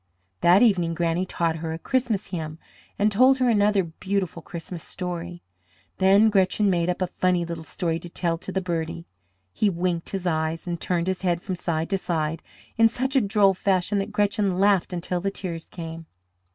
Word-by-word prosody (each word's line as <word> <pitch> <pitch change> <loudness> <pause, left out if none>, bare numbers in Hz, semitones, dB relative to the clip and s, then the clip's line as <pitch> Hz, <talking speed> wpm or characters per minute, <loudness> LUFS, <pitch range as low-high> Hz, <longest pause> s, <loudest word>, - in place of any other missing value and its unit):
That 180 - +6
evening 175 -7 +3
Granny 170 +2 0
taught 165 -2 -1
her 160 0 -4
a - - -4
Christmas 230 0 -1
hymn 160 -4 -5 0.4
and 210 +1 +2
told 255 +6 +5
her 255 -1 +2
another 205 -3 +3
beautiful 180 +1 -3
Christmas 170 0 -7
story. 175 -1 -5 0.6
Then 200 +3 +5
Gretchen 195 +1 +3
made 170 -1 +1
up 180 +1 0
a - - +2
funny 180 -1 0
little 165 -1 -6
story 165 +1 -2
to 175 - -10
tell 170 -1 -1
to 190 - -7
the 190 - -1
birdie. 170 -1 -3 0.5
He 210 - +2
winked 175 -2 -2
his 190 -2 -4
eyes 160 -1 -1
and 170 -2 -4
turned 175 -2 0
his 190 -1 -2
head 175 -3 +1
from 185 +1 -4
side 165 0 -2
to 195 - +1
side 160 -3 -2 0.4
in 225 0 +6
such 260 +4 -2
a 265 - +5
droll 200 -2 +3
fashion 190 +1 +1
that 195 - -3
Gretchen 205 -2 +1
laughed 195 -1 +3
until 175 0 -2
the 195 - 0
tears 175 -4 -6
came. 165 -1 -8
180 Hz, 190 wpm, -25 LUFS, 170-200 Hz, 0.6 s, That